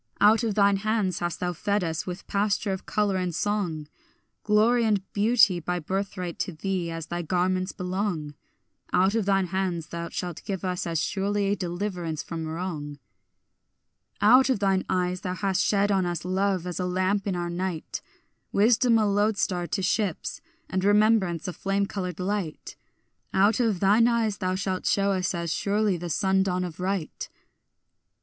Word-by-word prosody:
Out 215 +3 +5
of 220 -3 0
thine 200 -1 +4
hands 210 -3 0
hast 175 -1 -3
thou 180 0 -1
fed 200 +3 0
us 160 +1 -3
with 180 +1 -6
pasture 200 0 0
of 190 - -7
colour 205 -2 +1
and 180 -3 -2
song; 180 -8 -1 0.6
Glory 220 +3 +3
and 210 -4 +2
beauty 210 -3 +4
by 180 +2 -2
birthright 185 0 -3
to - - -1
thee 180 +1 -2
as 165 -1 -5
thy 175 +1 -3
garments 185 +2 0
belong; 180 -5 -3 0.6
Out 190 +2 +3
of 225 -3 0
thine 195 -1 +3
hands 180 -4 -1
thou 170 0 -5
shalt 175 -3 -5
give 195 -1 -4
us 180 -1 -2
as 165 -2 0
surely 200 +3 0
deliverance 175 -4 -3
from 165 -2 -5
wrong. 160 -3 -4 1.2
Out 250 +6 +6
of 260 - +2
thine 195 -1 +1
eyes 180 0 0
thou 180 -2 -3
hast 195 -2 0
shed 205 0 +2
on 190 -2 +2
us 175 -1 -3
love 190 -1 0
as 180 0 -4
a 180 - -1
lamp 185 +3 0
in 190 - 0
our 175 -1 -2
night, 175 -2 -4 0.5
Wisdom 230 +3 +4
a 215 - +3
lodestar 200 -3 +1
to 195 - -2
ships, 190 -2 -1 0.3
and 185 0 -2
remembrance 205 -4 +3
a 180 - -3
flame 195 +2 0
coloured 180 -3 -5
light; 185 -4 -3 0.6
Out 200 +4 +4
of 225 -7 +1
thine 210 +5 +5
eyes 225 -4 +1
thou 185 -1 0
shalt 190 -1 -2
shew 200 0 +2
us 185 -1 0
as 170 -1 -2
surely 205 -1 +1
the 175 0 -5
sun 190 +3 +2
dawn 185 -1 0
of 175 -2 -6
right. 185 -3 -3
190 Hz, 170 wpm, -26 LUFS, 175-205 Hz, 1.2 s, Out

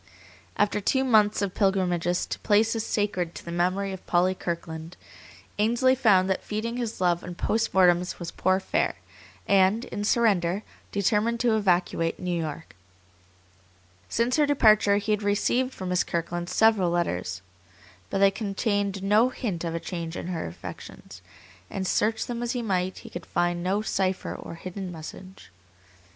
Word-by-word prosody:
After 210 0 +1
two 265 +6 +2
months 215 -5 +3
of 190 -2 -2
pilgrimages 180 -3 +1
to - - -5
places 220 +1 +2
sacred 185 -6 -1
to - - -9
the 170 - -6
memory 185 +3 0
of 190 - -9
Polly 180 +1 +3
Kirkland, 165 -1 -5 0.6
Ainsley 240 +4 +3
found 205 -8 +4
that 190 - -1
feeding 230 +3 -3
his 235 -3 -4
love 175 -2 +1
on 180 -1 -7
post 225 +5 0
mortems 180 -1 +3
was 170 -2 -6
poor 185 +1 +1
fare, - - 0 0.5
and, 200 +4 +3
in 205 - -5
surrender, 205 -4 +2 0.3
determined 210 +4 +1
to 235 -3 +3
evacuate 175 -4 +1
New 180 -1 -2
York. 160 - -5 1.3
Since 235 +4 +1
her 300 -1 +4
departure 215 -7 +5
he 205 +1 -2
had 210 0 +1
received 225 +5 +1
from 185 -7 -6
Miss 180 0 +2
Kirkland 175 +1 -3
several 210 -2 +3
letters, 90 - -2 0.7
but - - -1
they 195 0 +5
contained 200 -1 -1
no 210 +5 +4
hint 205 -10 -4
of 165 -1 -3
a - - -1
change 170 -2 -5
in 175 - -5
her 170 - -3
affections, 85 +1 -10 0.5
and 190 -1 -3
search 220 +4 +1
them 240 -1 -4
as 240 0 -1
he 245 -2 -2
might, 185 -3 -1
he - - -10
could 175 - -8
find 175 0 0
no 195 +4 0
cipher 190 -3 -1
or - - -8
hidden 185 +2 -6
message. 175 - -10
195 Hz, 160 wpm, -26 LUFS, 175-215 Hz, 1.3 s, departure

